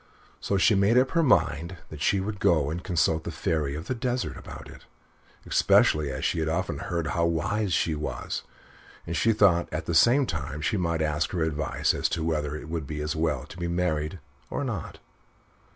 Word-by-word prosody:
So 100 - 0
she 110 - +4
made 100 +4 +4
up 130 +1 +3
her 165 - +3
mind 85 - +2
that 75 -2 -9
she 100 - +2
would 100 +1 -4
go 75 -6 +2
and 85 +3 -4
consult 80 -2 +1
the - - -4
Fairy 75 -4 -1
of 80 +2 -6
the - - -2
Desert 125 0 -2
about - - -10
it, - - -14 0.6
especially 75 -2 +3
as 65 0 -3
she 85 - 0
had 80 0 0
often 85 -3 -2
heard 85 -2 -2
how 85 0 +2
wise 95 +5 -1
she 80 -1 +1
was, 75 0 -4 0.6
and - - -3
she 115 - +3
thought 100 -6 +3
that 75 - -3
at 80 - -5
the 85 - -2
same 120 - +5
time 75 - -4
she 80 - 0
might 85 -4 0
ask 75 +1 0
her 85 -3 0
advice 75 -4 0
as - - 0
to 80 - -2
whether 75 -2 -1
it 75 - -7
would 80 -3 -4
be 75 -1 -5
as 75 0 -2
well 80 -5 0
to 80 - -12
be 85 - -2
married, 85 -1 -1 0.3
or - - -2
not. - - -4
85 Hz, 210 wpm, -27 LUFS, 75-95 Hz, 0.6 s, same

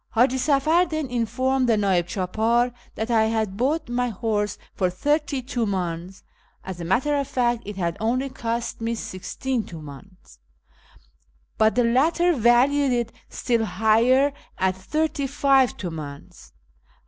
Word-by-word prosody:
Haji 250 +3 +3
Safar 305 +6 +3
then 310 -2 -2
informed 255 +2 0
the 225 - +4
'nd'ib 190 -4 +1
clidpdr 220 +7 0 0.2
that 220 +2 -3
I 220 -1 +4
had 220 -3 -1
bought 290 +7 0
my 245 +1 -1
horse 210 -1 -2 0.2
for 185 -2 0
thirty 285 - -1
Mmdns 190 -7 -3 0.4
(as 185 -2 -7
a - - -4
matter 250 - +1
of 280 -1 -1
fact 240 -2 0
it 205 - -5
had 170 -3 -2
only 250 +5 0
cost 235 -2 -4
me 230 +1 -1
sixteen 230 +5 -4
Hmdns), 155 - -12 1.2
but 220 0 +4
the 245 - +3
latter 320 +9 +3
valued 260 +3 +3
it 240 -2 0 0.2
still 235 -2 0
higher, 230 +7 +3 0.2
at 185 0 +1
thirty 290 +8 -1
five 270 -2 +3
Hmdns. 155 -6 -8
235 Hz, 135 wpm, -24 LUFS, 195-265 Hz, 1.2 s, the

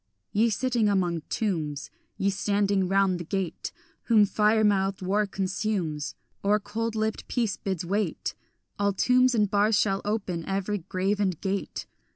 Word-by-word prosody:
Ye 225 +3 +3
sitting 235 -1 +1
among 175 -4 +1
tombs, 155 -9 -2 0.3
Ye 200 +1 +1
standing 200 -1 +1
round 195 -1 +2
the - - -4
gate, 190 0 -3 0.3
Whom 220 -3 +5
fire 215 +2 +3
mouthed 195 -2 +2
war 205 +3 +1
consumes, 190 -5 -2 0.3
Or 205 +1 +3
cold 225 +2 -3
lipped 220 0 -2
peace 225 -5 0
bids 190 -3 -3
wait, 200 +4 -1 0.5
All 200 0 +2
tombs 250 +5 +4
and 210 -2 +3
bars 205 +1 +3
shall 195 -2 +1
open, 200 -5 -2
every 195 +1 -1
grave 190 +4 -1
and 185 -5 0
grate. 195 0 -3
200 Hz, 150 wpm, -27 LUFS, 190-215 Hz, 0.5 s, Whom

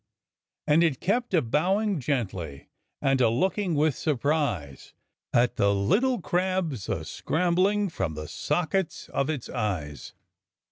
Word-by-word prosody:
"And 155 +3 +4
it 155 -6 +1
kept 240 +6 0
a 160 - +3
bowing 190 - +1
gently 95 - -3 0.3
and 135 -2 +3
a 120 - +5
looking 185 - 0
with 150 0 +3
surprise 135 - -1 0.4
At 120 +1 +2
the 100 0 +3
little 225 - +2
crabs 175 - -1
a - - -2
scrambling 185 +5 +1
from 95 - -3
the 75 0 -6
sockets 170 - -1
of 140 - -1
its 145 -6 -3
eyes." 80 -9 -4
150 Hz, 130 wpm, -27 LUFS, 115-185 Hz, 0.4 s, a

